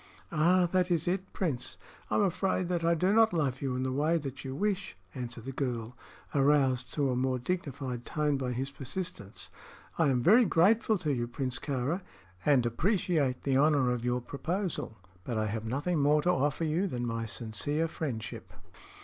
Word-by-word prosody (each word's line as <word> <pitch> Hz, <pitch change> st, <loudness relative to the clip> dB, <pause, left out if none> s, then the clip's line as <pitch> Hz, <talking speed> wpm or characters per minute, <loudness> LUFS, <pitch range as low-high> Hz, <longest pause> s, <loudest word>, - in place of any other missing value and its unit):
"Ah, 175 Hz, +3 st, +4 dB
that 185 Hz, -1 st, +2 dB
is 170 Hz, -2 st, +1 dB
it, 185 Hz, +2 st, -1 dB
Prince! 135 Hz, -10 st, -3 dB, 0.3 s
I'm -, -, +2 dB
afraid 185 Hz, -1 st, 0 dB
that 175 Hz, -2 st, 0 dB
I 170 Hz, 0 st, +3 dB
do 185 Hz, +5 st, +2 dB
not 225 Hz, -2 st, +5 dB
love 140 Hz, -6 st, 0 dB
you 135 Hz, -2 st, -1 dB
in 130 Hz, -, -1 dB
the 130 Hz, -, -1 dB
way 150 Hz, +5 st, +2 dB
that 140 Hz, -4 st, -6 dB
you 130 Hz, -1 st, -5 dB
wish," 195 Hz, -, -1 dB, 0.2 s
answered 120 Hz, -2 st, -6 dB
the 135 Hz, -, -4 dB
girl, 125 Hz, -3 st, -3 dB, 0.4 s
aroused 135 Hz, -3 st, +3 dB
to 140 Hz, -3 st, +1 dB
a -, -, 0 dB
more 130 Hz, +1 st, +1 dB
dignified 135 Hz, -4 st, -3 dB
tone 150 Hz, +1 st, 0 dB
by 130 Hz, -2 st, -2 dB
his 135 Hz, +3 st, -3 dB
persistence. 135 Hz, -, -5 dB, 0.5 s
"I 165 Hz, -, +4 dB
am 125 Hz, -3 st, +2 dB
very 225 Hz, -, +7 dB
grateful 215 Hz, +4 st, +3 dB
to 155 Hz, -5 st, -1 dB
you, 120 Hz, -2 st, -1 dB
Prince 125 Hz, +1 st, -3 dB
Kāra, 145 Hz, +6 st, -2 dB, 0.4 s
and 135 Hz, -5 st, +4 dB
appreciate 155 Hz, -, +1 dB
the 135 Hz, -2 st, +2 dB
honor 140 Hz, -3 st, +4 dB
of 120 Hz, -1 st, -2 dB
your 125 Hz, 0 st, 0 dB
proposal; 165 Hz, -, -3 dB, 0.3 s
but 120 Hz, +1 st, -3 dB
I 110 Hz, -, +1 dB
have 110 Hz, +1 st, -3 dB
nothing 145 Hz, +8 st, -1 dB
more 150 Hz, +1 st, +3 dB
to 180 Hz, -, +3 dB
offer 145 Hz, 0 st, 0 dB
you 165 Hz, +5 st, +1 dB
than 120 Hz, -7 st, -3 dB
my 115 Hz, -1 st, -2 dB
sincere 120 Hz, +9 st, -2 dB
friendship." 135 Hz, -9 st, -5 dB
140 Hz, 185 wpm, -30 LUFS, 125-170 Hz, 0.5 s, very